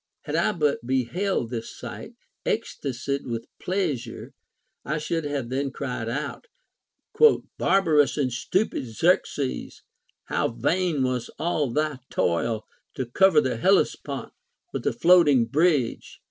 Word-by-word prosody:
Had -, -, -3 dB
I -, -, +3 dB
but 150 Hz, -6 st, +1 dB
beheld 130 Hz, -, -1 dB
this 115 Hz, -2 st, -5 dB
sight, -, -, -8 dB, 0.3 s
ecstasied 140 Hz, +1 st, -2 dB
with 115 Hz, -1 st, -3 dB, 0.2 s
pleas 170 Hz, -11 st, -1 dB
ure 115 Hz, -, -9 dB, 0.5 s
I 155 Hz, +3 st, -2 dB
should 155 Hz, +1 st, -2 dB
have 140 Hz, -5 st, -3 dB
then 135 Hz, +2 st, -1 dB
cried 125 Hz, -4 st, -4 dB
out: 145 Hz, -, -4 dB, 0.6 s
" 460 Hz, -1 st, +2 dB
Barbarous 160 Hz, -8 st, +3 dB
and 130 Hz, -4 st, 0 dB
stupid 185 Hz, -, -1 dB
Xerxes, 140 Hz, +1 st, 0 dB, 0.4 s
how -, -, 0 dB
vain 145 Hz, +6 st, 0 dB
was 125 Hz, -2 st, -1 dB
all 155 Hz, -4 st, 0 dB
thy 150 Hz, 0 st, -1 dB
toil 110 Hz, +6 st, 0 dB, 0.3 s
to 130 Hz, -, -2 dB
cover 160 Hz, +6 st, +4 dB
the 130 Hz, -4 st, -1 dB
Hellespont 115 Hz, -, +1 dB, 0.4 s
with -, -, -3 dB
a -, -, +3 dB
floating 165 Hz, -8 st, +5 dB
bridge 145 Hz, -1 st, +1 dB
140 Hz, 130 wpm, -25 LUFS, 120-165 Hz, 0.6 s, floating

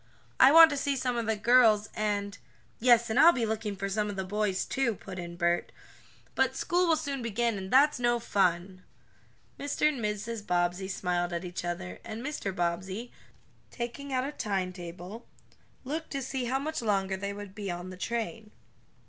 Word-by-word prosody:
I 265 Hz, -, +8 dB
want 325 Hz, 0 st, +9 dB
to 285 Hz, -, -2 dB
see 280 Hz, 0 st, 0 dB
some 250 Hz, -2 st, -1 dB
of 230 Hz, -2 st, -2 dB
the 220 Hz, -, +1 dB
girls, 220 Hz, -1 st, +4 dB
and 205 Hz, -2 st, -2 dB, 0.2 s
" -, -, -34 dB
"Yes, 235 Hz, -1 st, +4 dB
and -, -, +2 dB
I'll 335 Hz, +2 st, +9 dB
be 240 Hz, -3 st, 0 dB
looking 215 Hz, -1 st, -3 dB
for 195 Hz, +1 st, -3 dB
some 210 Hz, +1 st, -1 dB
of 205 Hz, -, -5 dB
the 190 Hz, -, -2 dB
boys, 200 Hz, 0 st, -1 dB
too," 255 Hz, -5 st, 0 dB
put 190 Hz, -1 st, -9 dB
in 170 Hz, 0 st, -7 dB
Bert. 175 Hz, 0 st, 0 dB, 0.6 s
"But -, -, +1 dB
school 355 Hz, +1 st, +1 dB
will 325 Hz, -, +4 dB
soon 280 Hz, -4 st, -3 dB
begin, 235 Hz, 0 st, 0 dB
and 190 Hz, -1 st, -6 dB
that's 280 Hz, +3 st, +4 dB
no 240 Hz, 0 st, +2 dB
fun!" 185 Hz, -3 st, 0 dB, 0.8 s
Mr. 285 Hz, +1 st, +1 dB
and 265 Hz, -7 st, -4 dB
Mrs. 210 Hz, +1 st, -3 dB
Bobbsey 175 Hz, +2 st, 0 dB
smiled 180 Hz, -2 st, -1 dB
at 170 Hz, +1 st, -3 dB
each 175 Hz, -1 st, -5 dB
other, 170 Hz, -, -5 dB
and 225 Hz, +4 st, -7 dB
Mr. 295 Hz, -9 st, -3 dB
Bobbsey, 185 Hz, +6 st, -3 dB, 0.6 s
taking 245 Hz, +4 st, -6 dB
out 255 Hz, -1 st, +1 dB
a 285 Hz, -, -3 dB
timetable, 185 Hz, -, -5 dB, 0.6 s
looked 310 Hz, +5 st, -4 dB
to 275 Hz, -1 st, -2 dB
see 260 Hz, -1 st, -3 dB
how 255 Hz, +3 st, 0 dB
much 310 Hz, +2 st, -3 dB
longer 195 Hz, -3 st, 0 dB
they 200 Hz, +1 st, -4 dB
would 200 Hz, -1 st, -8 dB
be 200 Hz, -1 st, -5 dB
on 175 Hz, +1 st, -5 dB
the -, -, -8 dB
train. 225 Hz, +2 st, -4 dB
215 Hz, 190 wpm, -29 LUFS, 190-250 Hz, 0.8 s, want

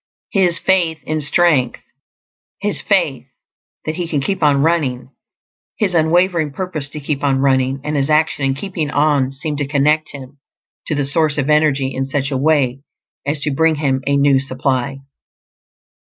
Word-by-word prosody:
His 180 Hz, -4 st, +2 dB
faith 170 Hz, -3 st, +1 dB
in 155 Hz, +3 st, -2 dB
strength, 145 Hz, -4 st, +2 dB, 0.8 s
his -, -, -2 dB
faith -, -, 0 dB, 0.6 s
that 155 Hz, 0 st, -3 dB
he 175 Hz, -2 st, -3 dB
can 150 Hz, -3 st, -1 dB
keep 195 Hz, +7 st, -2 dB
on 145 Hz, -2 st, +3 dB
running, 140 Hz, -6 st, 0 dB, 0.7 s
his 200 Hz, -5 st, 0 dB
unwavering 170 Hz, 0 st, +2 dB
purpose 155 Hz, -4 st, -4 dB
to 150 Hz, -, -7 dB
keep 145 Hz, -1 st, -3 dB
on 135 Hz, -2 st, +2 dB
running, 135 Hz, 0 st, +1 dB
and 150 Hz, 0 st, -3 dB
his 140 Hz, 0 st, 0 dB
action 155 Hz, -1 st, +1 dB
in 135 Hz, 0 st, +1 dB
keeping 160 Hz, -1 st, -4 dB
on 145 Hz, -3 st, +2 dB
seem 150 Hz, +2 st, -4 dB
to 145 Hz, -1 st, -2 dB
connect 150 Hz, +2 st, +1 dB
him 140 Hz, 0 st, -11 dB, 0.5 s
to 155 Hz, -, -1 dB
the 145 Hz, -1 st, 0 dB
source 155 Hz, +1 st, +3 dB
of 145 Hz, +1 st, 0 dB
energy 145 Hz, -3 st, +2 dB
in 135 Hz, -, -2 dB
such 140 Hz, 0 st, -2 dB
a 135 Hz, -, 0 dB
way 135 Hz, -3 st, +1 dB, 0.5 s
as 145 Hz, 0 st, -1 dB
to 150 Hz, -, -1 dB
bring 160 Hz, +3 st, +2 dB
him 135 Hz, -3 st, 0 dB
a 140 Hz, 0 st, +2 dB
new 140 Hz, -1 st, +4 dB
supply. 135 Hz, 0 st, -2 dB
145 Hz, 165 wpm, -18 LUFS, 135-160 Hz, 0.8 s, new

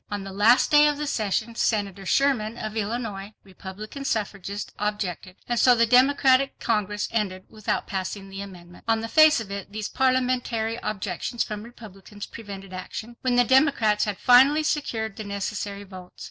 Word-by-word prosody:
On 205 Hz, -1 st, -4 dB
the 195 Hz, 0 st, -8 dB
last 220 Hz, +6 st, +4 dB
day 295 Hz, 0 st, +7 dB
of 295 Hz, -1 st, 0 dB
the 300 Hz, -, -3 dB
session, 220 Hz, -2 st, -1 dB
Senator 200 Hz, -4 st, -1 dB
Sherman 240 Hz, -5 st, +1 dB
of 215 Hz, -2 st, -5 dB
Illinois, 210 Hz, -2 st, -4 dB
Republican 195 Hz, +7 st, -9 dB
suffragist, 205 Hz, -4 st, -3 dB
objected. 200 Hz, -3 st, -3 dB
And 240 Hz, -1 st, 0 dB
so 250 Hz, +1 st, +6 dB
the 230 Hz, 0 st, +4 dB
Democratic 265 Hz, +2 st, +4 dB
Congress 210 Hz, -2 st, -1 dB
ended 195 Hz, -5 st, -2 dB
without 215 Hz, -1 st, -3 dB
passing 195 Hz, +1 st, -4 dB
the 195 Hz, 0 st, -7 dB
amendment. 175 Hz, -3 st, -12 dB
On 225 Hz, -1 st, +2 dB
the 225 Hz, -, -4 dB
face 310 Hz, +4 st, +6 dB
of 210 Hz, -3 st, -7 dB
it, 200 Hz, 0 st, -6 dB
these 215 Hz, 0 st, -4 dB
parliamentary 250 Hz, -3 st, 0 dB
objections 205 Hz, +3 st, -3 dB
from 210 Hz, -1 st, -6 dB
Republicans 210 Hz, -3 st, -11 dB
prevented 195 Hz, -4 st, -10 dB
action, 215 Hz, +5 st, -7 dB
when 255 Hz, -1 st, +1 dB
the 245 Hz, -, +5 dB
Democrats 250 Hz, -5 st, +3 dB
had 205 Hz, -2 st, -3 dB
finally 270 Hz, +5 st, +5 dB
secured 225 Hz, -9 st, -2 dB
the 215 Hz, -, -5 dB
necessary 200 Hz, 0 st, -4 dB
votes. 185 Hz, -2 st, -12 dB
215 Hz, 165 wpm, -25 LUFS, 200-245 Hz, -, day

